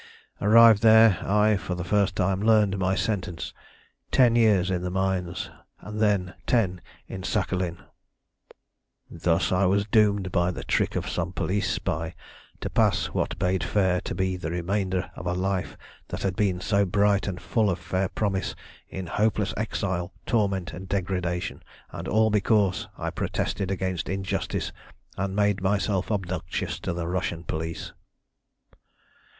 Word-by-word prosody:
Arrived 110 0 +7
there, 110 -2 +7
I 105 +1 +3
for 95 -1 -4
the 90 - -4
first 100 +2 +1
time 95 0 +1
learned 105 -3 +3
my 95 0 +1
sentence 95 -6 -2 0.6
ten 120 -3 +4
years 105 -6 +4
in 90 -1 -1
the 90 - -2
mines, 95 -1 -2 0.3
and 105 0 -7
then 100 -4 +1
ten 95 -7 +1 0.3
in 95 - -6
Sakhalin. 95 -3 -1 1.3
"Thus 85 0 +1
was 95 +2 +3
I - - -14
doomed 105 -4 +3
by 85 -1 +2
the 90 - -5
trick - - 0
of - - -2
some 90 0 -2
police 95 +2 -1
spy 85 -4 -2 0.5
to - - -3
pass - - +2
what - - -1
bade 90 -1 0
fair 95 -3 +1
to 95 - -5
be 95 0 -1
the 85 -3 -4
remainder 95 +1 -1
of - - -6
a 90 - 0
life 95 0 -2 0.3
that - - -5
had 95 -1 0
been 95 -4 +1
so 100 +2 +2
bright 100 +1 +2
and 90 -2 -3
full 110 -3 +1
of 90 - 0
fair 95 +2 -2
promise 100 -3 -2 0.3
in 95 -1 -5
hopeless 105 +2 0
exile, 95 -5 -2
torment, 100 -6 0
and 95 +3 -8
degradation 90 -2 -2 0.3
and - - -6
all 110 +1 +3
because 105 -2 +2
I - - -3
protested 100 -2 -2
against 95 -2 -2
injustice 95 0 -2 0.4
and 95 0 -2
made 105 -1 +2
myself 100 0 0
obnoxious 90 -5 -3
to - - -3
the 85 -1 -3
Russian 85 -1 -2
police. 80 0 -4
95 Hz, 150 wpm, -26 LUFS, 90-105 Hz, 1.3 s, Arrived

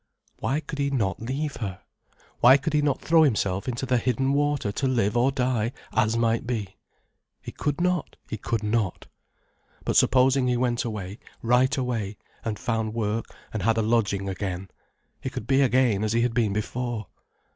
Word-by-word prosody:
Why 145 +4 0
could 150 - -7
he 140 0 +1
not 105 -10 -1
leave 140 +5 -3
her? 95 -5 -4 0.6
Why 130 +3 +8
could 145 +3 -3
he 150 - +3
not 145 -2 0
throw 165 0 +4
himself 100 -9 +1
into 125 +1 -2
the 125 -1 +2
hidden 130 +3 +1
water 145 -6 +1
to 135 +6 -1
live 115 -5 +1
or 125 +3 +3
die, 125 -3 0 0.2
as 110 +1 +2
might 115 0 +1
be? 105 -6 -3 0.6
He - - -8
could 145 +1 -2
not, 180 -2 0
he - - -4
could 110 +1 -2
not. 105 -3 -1 0.8
But - - 0
supposing 130 0 +4
he 125 -1 +2
went 120 -1 0
away, 105 -3 -5 0.2
right 125 +4 +3
away, 115 -6 -2 0.3
and 110 -2 -2
found 110 -2 -2
work, 110 0 -1 0.3
and 110 - -2
had 115 +4 +2
a 110 - +2
lodging 105 -3 +1
again. 95 -1 -4 0.5
He - - -3
could - - -6
be 135 +2 +3
again 125 -5 +3
as 110 0 0
he 115 - +2
had 120 -1 +1
been 115 -4 +2
before. 115 +2 -3
120 Hz, 180 wpm, -26 LUFS, 105-130 Hz, 0.8 s, Why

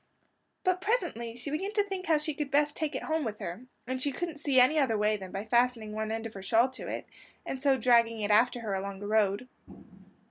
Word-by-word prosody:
But 370 -1 +1
presently 345 - -1
she 250 +4 -6
began 380 +7 -2
to 415 -1 +3
think 385 -2 -5
how 320 -2 +4
she 300 +1 -3
could 290 -1 -3
best 290 +1 +2
take 310 -2 -2
it - - -3
home 315 -1 0
with 215 -4 -3
her; 190 +9 -7 0.2
and 260 +1 -3
she 285 - 0
couldn't 325 +2 -4
see 280 -3 +3
any 260 +5 +5
other 245 -6 +2
way 210 +1 +2
than 190 -3 -8
by 195 +2 -4
fastening 235 -1 +1
one 215 0 -2
end 225 0 -3
of 225 - -6
her 195 - -8
shawl 230 +6 +3
to 260 - -8
it, - - -4 0.4
and 260 - -4
so 275 -1 +3
dragging 230 -2 +4
it 210 0 0
after 240 +3 +4
her 215 -3 -3
along 195 0 -4
the 205 - -7
road. 210 +2 +1
250 Hz, 240 wpm, -30 LUFS, 215-295 Hz, 0.4 s, any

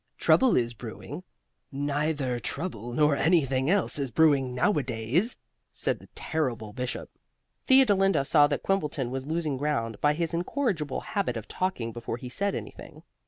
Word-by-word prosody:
Trouble 260 -3 +4
is 120 -1 0
brewing 110 - -8 0.3
" - - -51
"Neither 145 -2 -1
trouble, 120 - -4
nor 150 +3 +3
anything 135 -4 +2
else, 195 -5 +2
is 135 -2 -1
brewing 135 -1 +3
nowadays," 135 - 0 0.3
said - - -1
the - - -16
terrible 120 -9 -2
Bishop. 125 0 -5 0.6
Theodolinda 195 - +4
saw 145 +1 +5
that 145 - -2
Quimbleton 150 -10 -1
was 135 +1 -4
losing 155 -3 -1
ground 130 -6 -2
by 150 0 +3
his 165 0 -2
incorrigible 175 - -1
habit 195 - -2
of 110 - -7
talking 155 -12 -2
before 115 0 -5
he 125 +1 -8
said 200 +10 -1
anything. - - -9
145 Hz, 150 wpm, -27 LUFS, 125-170 Hz, 0.6 s, saw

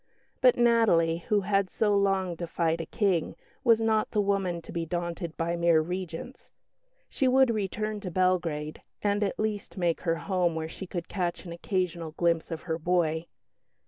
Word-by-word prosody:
But 255 -2 +5
Natalie, 205 -9 +3
who 210 -1 +3
had 195 -1 +1
so 210 +1 +1
long 195 -2 +1
defied 165 -1 -1
a - - -7
King, 190 -6 0 0.3
was 230 -3 +5
not 220 -1 +1
the 210 - -1
woman 195 -4 0
to - - -10
be 170 - -2
daunted 170 0 -4
by 170 +1 -1
mere 170 -1 +4
Regents. 180 +7 -5 0.6
She 265 - 0
would 260 -1 +5
return 215 +1 -2
to 195 -3 -5
Belgrade, 170 -4 0 0.2
and 205 0 +1
at 200 - -2
least 215 -2 -3
make 175 -3 0
her 165 -2 +1
home 180 -2 0
where 160 0 -3
she 190 +4 -8
could 175 -2 -5
catch 180 -1 -3
an 170 - -7
occasional 170 -2 -2
glimpse 170 -1 +1
of 165 -1 -5
her 165 -2 -2
boy. 165 -1 0
180 Hz, 175 wpm, -28 LUFS, 165-205 Hz, 0.6 s, But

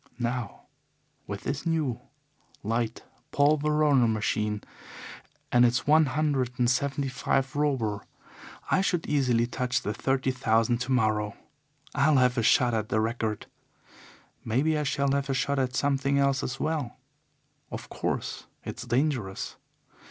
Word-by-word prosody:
Now, 120 -3 -3 0.6
with 100 -1 -5
this 140 +1 -3
new, 155 -8 0 0.6
light 115 +1 -2 0.3
Paul 145 +2 +4
Veroner 150 -4 +3
machine 105 -1 -1 0.9
and 120 0 +5
its 120 0 +2
one 155 +1 +5
hundred 130 -3 0
and 125 -2 +2
seventy 135 +3 0
five 135 +1 -1
Robur, 130 -9 0 0.7
I 190 - +4
should 175 -4 0
easily 125 -5 +2
touch 125 +1 -1
the 105 - -2
thirty 135 +2 0
thousand 120 -2 +1
tomorrow. 110 -5 0 0.6
I'll 145 +1 +3
have 125 -1 +3
a 120 - +1
shot 120 +2 +4
at 110 -1 -1
the 110 - +1
record. 110 -1 -2 1.0
Maybe 140 +8 +1
I 150 - 0
shall 140 -1 0
have 140 0 0
a 135 - +1
shot 140 +2 0
at 125 -1 -1
something 140 0 +1
else 140 -1 +2
as 135 +2 -4
well. 155 -6 -2 0.7
Of - - -7
course, - - -3 0.2
it's - - -6
dangerous. 120 -6 -1
130 Hz, 135 wpm, -27 LUFS, 115-140 Hz, 1.0 s, and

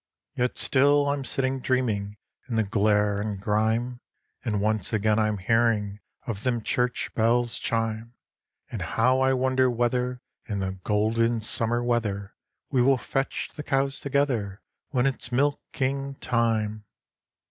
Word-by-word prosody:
Yet 125 0 -1
still 145 +1 +4
I'm 140 -1 -1
sitting 130 +1 -1
dreaming 110 -6 -1 0.3
in 115 - -2
the 110 - +3
glare 105 -1 +2
and 105 -2 -3
grime; 110 +4 0 0.4
And 110 -5 -1
once 110 -1 0
again 110 0 +2
I'm 110 -1 +1
hearing 105 0 +1 0.3
of 110 -6 -4
them 120 -2 -1
church 125 +2 -1
bells 120 +1 +2
chime; 115 +1 -2 0.6
And - - -4
how 125 +3 +2
I 130 0 +3
wonder 130 0 +2
whether 125 +1 0 0.3
in 105 - -2
the 95 -1 -1
golden 115 +2 +1
summer 115 +2 0
weather 105 -5 -1 0.4
We 130 - +3
will 135 +1 +4
fetch 135 +2 -2
the 150 - -5
cows 135 -1 0
together 130 -8 -1 0.3
when 125 -3 +1
it's 130 -2 -1
milking 140 0 -1
time. 110 -4 0
115 Hz, 135 wpm, -26 LUFS, 110-130 Hz, 0.6 s, still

